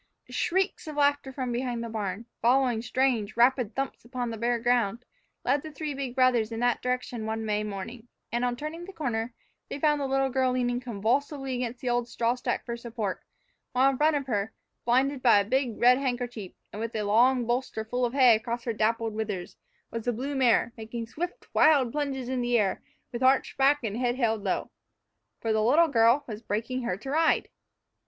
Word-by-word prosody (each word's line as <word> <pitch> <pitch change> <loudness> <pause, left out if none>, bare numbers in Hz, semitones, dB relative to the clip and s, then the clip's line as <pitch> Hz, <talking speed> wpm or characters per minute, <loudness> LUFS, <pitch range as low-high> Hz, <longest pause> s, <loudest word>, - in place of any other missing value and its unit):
SHRIEKS 380 -1 0
of 305 - -6
laughter 285 -2 +2
from 255 -2 -3
behind 240 -1 -2
the - - -4
barn, 215 -1 -4 0.2
following 245 -1 +3
strange, 235 -3 0
rapid 240 -2 +3
thumps 270 0 -3
upon 245 0 -4
the 225 - -5
bare 235 +2 +1
ground, 240 -1 +1 0.4
led 275 +3 +2
the 315 - -8
three 300 0 -4
big 270 -3 -5
brothers 250 -4 +3
in 225 - -4
that 245 0 +1
direction 250 -3 -2
one 220 0 -3
May 210 0 0
morning, 210 +4 -6 0.2
and, 240 +1 -1
on 245 -1 0
turning 310 +6 -6
the 390 - -10
corner, 235 -6 -3 0.3
they - - -5
found 295 -1 +2
the 275 - -1
little 270 0 +1
girl 260 0 +1
leaning 245 -1 0
convulsively 255 +4 -1
against 245 -1 -3
the 255 - -2
old 240 0 0
straw 235 0 0
stack 250 - -3
for 235 - -3
support, 230 -4 -4 0.5
while 260 +2 +4
in 265 - -4
front 305 +1 +4
of 280 -2 -1
her, 215 -4 -1 0.3
blinded 260 +3 +2
by 235 -5 +6
a 200 - 0
big, 250 0 0
red 250 +2 +6
handkerchief, 245 -6 -3 0.2
and 210 - -6
with 230 0 -4
a 215 - -1
long 240 +4 +3
bolster 240 -2 -2
full 245 +3 -2
of 240 0 0
hay 255 -4 +6
across 235 +2 -3
her 230 - -2
dappled 225 +1 0
withers, 210 -5 -4 0.4
was 230 -1 -5
the 245 - +2
blue 265 +6 -4
mare, 245 -3 +3
making 230 +1 -5
stiff, 335 +11 -4 0.2
wild 280 -6 +5
plunges 275 -3 -2
into 255 -1 -1
the 240 0 +2
air, 200 -4 0 0.3
with 240 - -5
arched 260 +1 +3
back 275 +1 +3
and 215 -1 -2
head 245 -1 0
held 225 -5 0
low. 190 - -2 0.7
For 225 -1 0
the 220 - +2
little 300 +9 +4
girl 235 +2 +4
was 215 -2 -7
breaking 230 +4 -2
her 190 -7 -2
to 270 +6 -7
ride! 320 +2 +2
245 Hz, 205 wpm, -27 LUFS, 225-265 Hz, 0.7 s, by